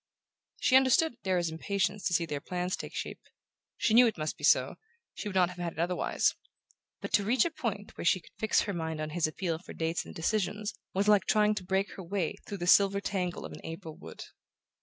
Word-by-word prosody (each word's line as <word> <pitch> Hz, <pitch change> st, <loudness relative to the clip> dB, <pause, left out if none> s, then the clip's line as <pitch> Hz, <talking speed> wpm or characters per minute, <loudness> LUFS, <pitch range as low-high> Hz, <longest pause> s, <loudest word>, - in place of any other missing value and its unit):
She 255 Hz, -, +3 dB
understood 265 Hz, +1 st, +4 dB
Darrow's 180 Hz, -3 st, 0 dB
impatience 195 Hz, +4 st, -1 dB
to 175 Hz, -, -1 dB
see 170 Hz, -, +2 dB
their 145 Hz, -3 st, -4 dB
plans 180 Hz, +2 st, -2 dB
take -, -, -8 dB
shape. -, -, -5 dB, 0.6 s
She 220 Hz, -, +1 dB
knew 245 Hz, +1 st, +8 dB
it 220 Hz, -, -2 dB
must 155 Hz, 0 st, -2 dB
be -, -, -15 dB
so, -, -, +3 dB, 0.4 s
she 210 Hz, -, -5 dB
would 190 Hz, -, -8 dB
not 180 Hz, -2 st, +4 dB
have 180 Hz, 0 st, -10 dB
had 170 Hz, -2 st, -3 dB
it -, -, -10 dB
otherwise; 175 Hz, +2 st, +1 dB, 0.7 s
but -, -, -6 dB
to 205 Hz, -, +4 dB
reach 230 Hz, +4 st, +3 dB
a 340 Hz, -, -1 dB
point 210 Hz, -9 st, -4 dB
where -, -, -4 dB
she 185 Hz, -, +4 dB
could -, -, -19 dB
fix 220 Hz, -, +3 dB
her 205 Hz, -, -3 dB
mind 160 Hz, -2 st, -3 dB
on 155 Hz, 0 st, -3 dB
his 165 Hz, 0 st, +1 dB
appeal 165 Hz, 0 st, -3 dB
for 185 Hz, -, -11 dB
dates 165 Hz, +1 st, -1 dB
and -, -, -11 dB
decisions 210 Hz, +4 st, -1 dB, 0.2 s
was 200 Hz, +2 st, +1 dB
like 205 Hz, -2 st, +5 dB
trying 210 Hz, 0 st, +3 dB
to 210 Hz, -3 st, -5 dB
break 190 Hz, +2 st, 0 dB
her 190 Hz, -, -6 dB
way 175 Hz, -2 st, -1 dB
through 200 Hz, -, -5 dB
the 175 Hz, -, -4 dB
silver 200 Hz, +2 st, +5 dB
tangle 185 Hz, -3 st, -3 dB
of -, -, -8 dB
an -, -, -10 dB
April 165 Hz, -1 st, -7 dB
wood. 80 Hz, -, -10 dB
190 Hz, 225 wpm, -30 LUFS, 170-210 Hz, 0.7 s, knew